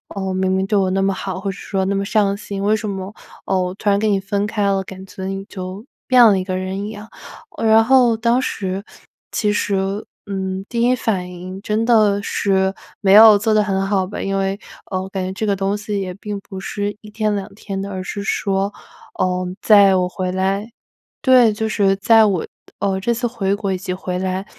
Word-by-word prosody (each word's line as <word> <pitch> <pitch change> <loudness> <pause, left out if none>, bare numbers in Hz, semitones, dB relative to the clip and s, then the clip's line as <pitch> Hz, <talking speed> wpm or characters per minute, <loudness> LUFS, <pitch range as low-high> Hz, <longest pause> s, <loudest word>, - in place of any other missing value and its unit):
嗯， 190 -1 -2
明 185 0 +1
明 190 0 +1
对 210 - -1
我 190 -1 +1
那 195 +1 +1
么 195 0 +1
好， 190 -1 -5
或 195 0 -3
者 - - -9
说 190 -2 -2
那 200 - 0
么 195 - 0
上 200 -1 +1
心， 200 -1 -6
为 210 +2 +3
什 215 -1 -4
么， 195 +1 -5 0.3
嗯， 185 -1 +1
我 180 - -5
突 205 +1 -1
然 200 - +2
跟 215 -1 +1
你 195 - +2
分 200 +1 -2
开 210 -1 -2
了， 195 -1 +2
感 190 0 -10
觉 190 0 -8
你 195 +1 -4
就 190 +4 -7 0.2
变 250 -2 +7
了 200 -4 +5
一 - - -2
个 185 -1 -3
人 190 +2 -4
一 - - -5
样。 215 0 -9 0.5
呃 225 - -2
然 220 +1 +6
后 245 -3 +4
当 235 +3 +2
时， 195 -4 -3 0.5
其 210 -2 0
实， 205 -1 0 0.5
嗯， 190 -1 -4
第 235 -1 -2
一 250 +1 +4
反 190 -6 -2
应 185 +2 -8
真 215 +2 -1
的 215 -4 +4
是 190 -1 +1 0.3
没 195 -1 +4
有 215 -1 +9
做 215 +2 +1
得 215 -1 +4
很 195 -1 -1
好 190 -2 +1
吧， 205 - -6
因 195 0 -2
为， 195 +1 -1 0.3
嗯， 185 -1 -1
我 190 - -8
感 190 -1 -3
觉 185 - -3
这 215 +3 -3
个 200 -1 +1
东 195 +1 -1
西 205 -1 -3
也 185 -1 -4
并 205 0 -6
不 190 -1 -9
是 205 +2 -4
一 210 -1 -12
天 215 -1 0
两 195 -1 -4
天 195 -2 -6
的， 200 - -5
而 185 -1 -4
是 200 +2 -5
说， 195 0 -1 0.5
嗯， 180 0 -1
在 200 -3 +6
我 180 -1 +1
回 185 0 -3
来 195 +4 -1 0.5
对， 255 -6 +5
就 220 +1 -2
是 195 -2 +2
在 225 +2 +5
我， 190 -5 0 0.3
嗯， 190 -1 -1
这 235 +4 +1
次 240 +1 -1
回 200 -5 -1
国 200 -2 -2
以 - - -2
及 185 0 -4
回 180 -1 -4
来， 190 +1 -2
195 Hz, 245 characters per minute, -19 LUFS, 190-210 Hz, 0.5 s, 有